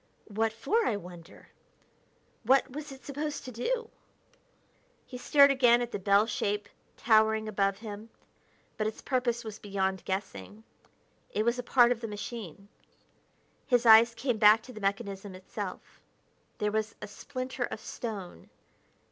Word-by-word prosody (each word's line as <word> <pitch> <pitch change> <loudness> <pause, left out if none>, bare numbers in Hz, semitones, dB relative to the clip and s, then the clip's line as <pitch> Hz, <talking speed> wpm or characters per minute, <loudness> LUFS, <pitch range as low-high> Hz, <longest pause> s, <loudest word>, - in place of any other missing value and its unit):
What 220 +2 0
for, 435 - 0
I 210 - 0
wonder? 175 -3 -13 0.9
What 260 +3 +3
was 295 +2 -7
it 270 0 -12
supposed 290 +1 -4
to 255 - -7
do?" 465 - -3 1.1
He 250 - -9
stared 280 +2 +6
again 245 -3 +5
at 240 -1 -3
the - - -3
bell 200 +2 +4
shape 210 -2 -2 0.3
towering 220 -1 +3
above 195 -2 0
him, 215 0 -8 0.7
but 215 - 0
its 215 - -5
purpose 250 -2 -1
was 220 -2 -8
beyond 190 -2 -2
guessing: 200 +2 -5 0.7
it 215 - -1
was 235 +1 +1
a - - 0
part 245 0 +4
of 240 -1 -1
the 230 - -4
machine. 205 -3 -7 1.0
His 245 -2 +2
eyes 230 +1 +7
came 240 -1 -1
back 215 +1 +6
to 255 - -11
the 215 - -10
mechanism 195 -1 -3
itself. 185 0 -8 0.6
There 210 0 -1
was 215 0 -2
a - - -6
splinter 255 +2 -5
of - - -7
stone.... 205 - -7
220 Hz, 145 wpm, -29 LUFS, 205-245 Hz, 1.1 s, eyes